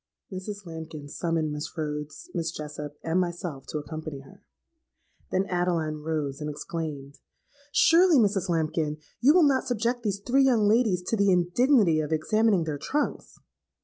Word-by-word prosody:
"Mrs. 200 +2 -6
Lambkin 160 -3 -8
summoned 160 0 -1
Miss 150 +3 -6
Rhodes, 150 -1 -5
Miss 165 -1 -1
Jessop, 150 -2 -7
and 165 +3 +1
myself 175 -6 -4
to - - -4
accompany 155 -1 -6
her. 135 - -17 0.9
Then 190 +1 +1
Adeline 175 -4 -1
rose, 150 -2 -3
and 150 - -3
exclaimed, 145 -2 -6 0.5
'Surely, 335 +2 +5
Mrs. 200 -5 +2
Lambkin, 155 -2 0 0.2
you 265 +4 +6
will 350 +2 +5
not 265 -1 +1
subject 240 0 0
these 205 -3 -2
three 255 +6 +2
young 230 -6 +3
ladies 210 -5 +3
to 225 - -1
the 200 -2 +3
indignity 180 - +3
of 155 0 -3
examining 205 +4 +2
their 155 -3 -4
trunks?' 295 - -3
170 Hz, 150 wpm, -27 LUFS, 155-210 Hz, 0.9 s, you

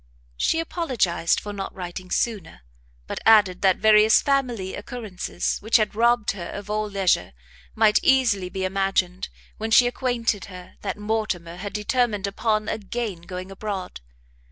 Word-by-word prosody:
She 325 - +1
apologised 255 - 0
for 205 - -7
not 195 -1 -6
writing 185 0 -7
sooner, 200 - -2 0.4
but - - -5
added 205 -5 +5
that 190 -2 +4
various 215 0 +6
family 250 -9 -1
occurrences, 205 -6 -4
which 220 +3 +3
had 215 -2 0
robbed 235 0 +2
her 180 -4 -7
of 205 0 -7
all 215 0 -1
leisure, 190 - +1 0.4
might 215 -1 +4
easily 230 -9 +2
be 190 +1 -3
imagined, 190 -1 -1 0.3
when 220 +1 -3
she 245 +2 +6
acquainted 245 -4 -1
her 180 -2 -11
that 200 - -4
Mortimer 210 -6 -3
had 200 +2 -6
determined 210 -1 0
upon 215 +1 -1
again 210 -3 -4
going 185 +2 -7
abroad.... 195 - -5
210 Hz, 145 wpm, -24 LUFS, 185-225 Hz, 0.4 s, various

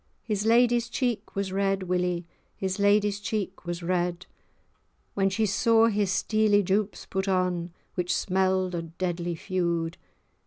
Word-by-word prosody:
His 210 -1 -1
lady's 240 0 +4
cheek 245 -3 -2
was 200 -1 -2
red, 195 0 0
Willie, 180 -1 -1 0.3
His 190 0 -3
lady's 205 0 +3
cheek 195 -3 -4
was 175 0 -4
red, 175 0 -1 0.9
When 195 -1 +2
she 215 +3 0
saw 225 +3 +4
his 205 -3 0
steely 210 0 +2
jupes[#] 200 +2 -1
put 190 +1 -2
on, 180 -2 0 0.2
Which 180 -1 0
smell'd 185 -1 +1
o' 170 - -1 0.2
deadly 175 -1 -2
feud. 170 -2 -1
190 Hz, 140 wpm, -27 LUFS, 180-210 Hz, 0.9 s, lady's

